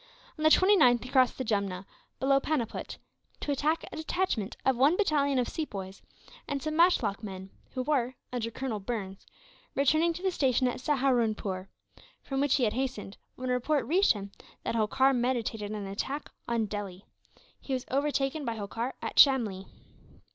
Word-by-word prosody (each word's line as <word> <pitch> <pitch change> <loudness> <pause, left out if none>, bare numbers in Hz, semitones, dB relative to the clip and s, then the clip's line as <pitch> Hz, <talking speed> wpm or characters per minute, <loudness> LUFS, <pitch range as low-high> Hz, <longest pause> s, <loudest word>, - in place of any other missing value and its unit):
On 310 - -6
the 310 - +6
29th 315 - +5
he 255 - -9
crossed 255 -3 +4
the 260 - -2
Jumna, 200 -4 -1 0.3
below 275 +1 +3
Panniput, 270 -6 -3 0.4
to 290 - -2
attack 300 +4 0
a - - -7
detachment 315 - -2
of 265 - +4
one 280 +8 +4
battalion 285 -8 +2
of 250 - +1
Sepoys 195 -11 -5 0.5
and 285 -1 -2
some 310 +2 -3
matchlock 310 - +3
men 190 -2 -8 0.2
who 255 - -1
were, 255 -3 0 0.2
under 235 -2 -2
Colonel 230 -2 -4
Burns, 195 -2 -5 0.5
returning 310 +5 +3
to 355 - -8
the 380 - +2
station 260 -6 +2
at 250 - -3
Saharunpoor 230 -9 0 0.6
from 270 0 -2
which 285 -2 +3
he 265 - +1
had 215 - +2
hastened, 250 -6 -3 0.2
when 255 0 -3
a - - +3
report 275 +4 +1
reached 380 +6 +4
him 200 -2 -7 0.3
that - - -2
Holkar 260 +5 +3
meditated 240 -4 -1
an 210 -1 -4
attack 265 +9 -4 0.2
on 235 -2 +1
Delhi. 200 -2 -6 0.5
He 270 - -5
was 255 0 -2
overtaken 280 +1 0
by 230 -3 -2
Holkar 225 +4 -4
at - - -1
Shamlee. 225 -9 +5
255 Hz, 170 wpm, -29 LUFS, 215-285 Hz, 0.6 s, the